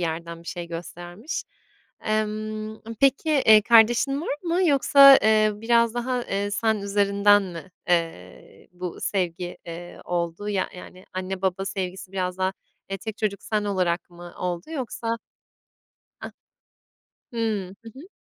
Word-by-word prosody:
yerden 165 0 -4
bir - - -10
şey 175 -1 -5
göstermiş. 175 - -6 0.6
Emm, 215 0 -2
ımm, 220 +1 -10
peki, 275 +3 +3
eee, 220 -7 +6
kardeşin 235 +5 +4
var 290 - -2
mı 350 +2 +1
yoksa, 275 -1 +8
eee, 215 0 +4
biraz 230 +1 +2
daha, 245 +1 -1
eee, 200 +1 -2
sen 220 +2 +1
üzerinden 200 0 +3
mi, 180 -1 -8 0.2
eee, 165 - -3
bu 180 -1 -6
sevgi, 180 -2 -2
eee, 170 +1 -8
oldu? 175 +3 -3
Ya 195 -2 0
yani 185 +1 -12
anne 185 0 -4
baba 190 0 0
sevgisi 190 -1 -5
biraz 185 -1 -2
daha, 190 0 +1 0.4
eee, 195 - -3
tek 220 +1 -6
çocuk 205 -2 -2
sen 210 -1 -1
olarak 180 -3 -1
mı 175 0 -12
oldu 180 - -4
yoksa 230 -5 -3 1.0
A - - -7 1.0
Hımm, 215 -5 -2
hı 225 - -9
hı. 295 +8 -12
200 Hz, 140 wpm, -24 LUFS, 180-225 Hz, 1.0 s, yoksa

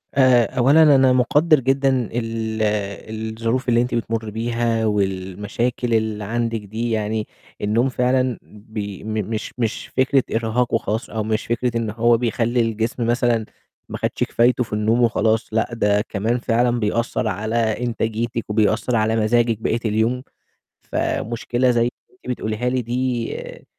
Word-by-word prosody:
آآ، 130 -3 +5
أولًا 145 +3 +6
أنا 130 -1 +5
مقدِّر 150 +4 +4
جدًا 135 +1 +2 0.2
ال 115 -2 -3 0.8
الظروف 125 +3 0
اللي 120 0 +4
أنتِ 125 0 -1
بتمُرّي 115 -2 -2
بيها 115 0 -1
والمشاكل 105 +4 -1
اللي 110 -1 0
عندِك 115 +1 -1
دي، 110 +4 -4
يعني 110 0 -1 0.3
النوم 115 +5 +2
فعلًا 125 -1 +1
بي 105 -2 -8
م 110 0 -4 0.2
مش 110 -2 -4
مش 115 -3 -2
فكرة 130 0 +2
إرهاق 115 +2 0
وخلاص، 110 0 -1
أو 110 -1 -2
مش 110 +1 -1
فكرة 120 0 -1
إن 115 -2 -2
هو 115 +2 +3
بيخلّي 120 0 0
الجسم 115 +1 -1
مثلًا 120 -2 +1 0.4
ما - - -4
خدش - - -1
كفايتُه 125 +1 +2
في 105 - -9
النوم 110 +3 +2
وخلاص، 115 -1 +2
لأ، 110 - +1
ده 105 -3 +2
كمان 110 +2 -1
فعلًا 120 0 +1
بيأثّر 115 +2 -1
على 110 +1 -2
إنتاجيتِك 115 0 -1
وبيأثّر 110 +3 +1
على 110 0 +2
مزاجِك 115 +1 +2
بقية 115 +1 0
اليوم، 110 +4 +1 0.6
فمشكلة 120 +2 -1
زي 120 -1 +2 0.3
أنتِ 185 - -19
بتقوليها 110 +1 -2
لي 125 0 0
دي، 120 0 -2
آآ، - - -11
115 Hz, 145 wpm, -21 LUFS, 110-120 Hz, 0.8 s, أولًا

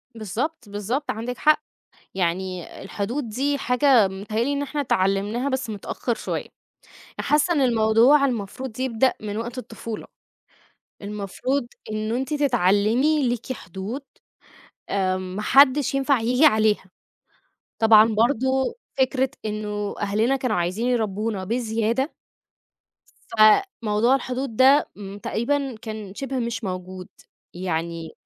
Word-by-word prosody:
بالضبط، 235 - -4
بالضبط، 215 +8 -2
عندِك 235 +3 -5
حق. 305 0 +4 0.5
يعني 185 0 -2 0.2
الحدود 225 +7 -3
دي 280 +6 0
حاجة 250 -4 +4
متهيأ 205 +4 -3
لي 280 +4 0
إن 285 - -1
إحنا 290 +1 -2
اتعلمناها 205 +3 0
بس 260 -3 -2
متأخر 220 +3 -3
شوية. - - -4 0.7
حاسة 300 +4 +2
إن 295 - +1
الموضوع 235 +3 +4
المفروض 245 0 -3
يبدأ 260 0 +2
من 210 -1 -5
وقت 235 +3 -5
الطفولة. 230 -3 -7 1.0
المفروض 210 +6 -2 0.3
إنه 215 +2 -2
أنتِ 265 +3 -2
تتعلمي 250 +2 +2
ليكِ 240 +1 -2
حدود 205 +4 -6 0.9
آآ 185 -2 +1
ماحدش 255 +10 +3
ينفع 275 -1 +2
ييجي 250 +6 +3
عليها. 215 -7 +3 0.9
طبعًا 220 -1 +7
برضه 260 +3 +1 0.2
فكرة 265 0 +2 0.2
إنه 210 -1 -3
أهلنا 215 +6 +1
كانوا 255 -5 -1
عايزين 185 +7 -1
يربونا 215 -4 -1
بزيادة 230 - -1 1.2
فموضوع 220 - +4
الحدود 255 -2 -3
ده 270 +4 +5
م 200 -1 -8
تقريبًا 265 +5 -1
كان 215 -3 -7
شِبه 270 +1 -3
مش 235 -1 -3
موجود. 185 -1 -5 0.5
يعني 165 -2 -3
230 Hz, 115 wpm, -23 LUFS, 205-265 Hz, 1.2 s, طبعًا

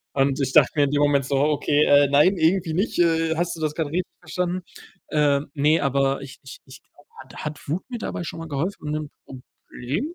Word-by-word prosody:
Und 135 0 +1
ich 135 -1 -1
dachte 150 -4 +5
mir 145 - +3
in 140 - -1
dem 145 0 +1
Moment 140 -2 +2
so: 135 +1 -1
„Okay, 150 +1 +2
äh, 145 0 +5
nein, 150 +8 +4
irgendwie 165 0 +1
nicht. 195 +2 -1
Äh, 165 -1 +2
hast 175 0 -2
du - - -10
das 150 -1 -1
grad 160 - -2
richtig 180 +5 -1 0.2
verstanden?“ 180 0 -3 0.5
Ähm, 145 -1 +2
ne, 150 +3 +3
aber 135 0 +1
ich 135 -2 -10
ich 135 - -11
ich 130 -1 -13
glaube, 145 - -26
hat 130 - -16
hat 150 -1 -7
Wut 165 +6 -2
mir 245 -2 -5
dabei 175 - -5
schon 165 - -7
mal 165 - -7
geholfen, 150 +1 -3
'n 155 -1 -4
Problem 135 - -7
150 Hz, 220 wpm, -23 LUFS, 140-165 Hz, 0.5 s, dachte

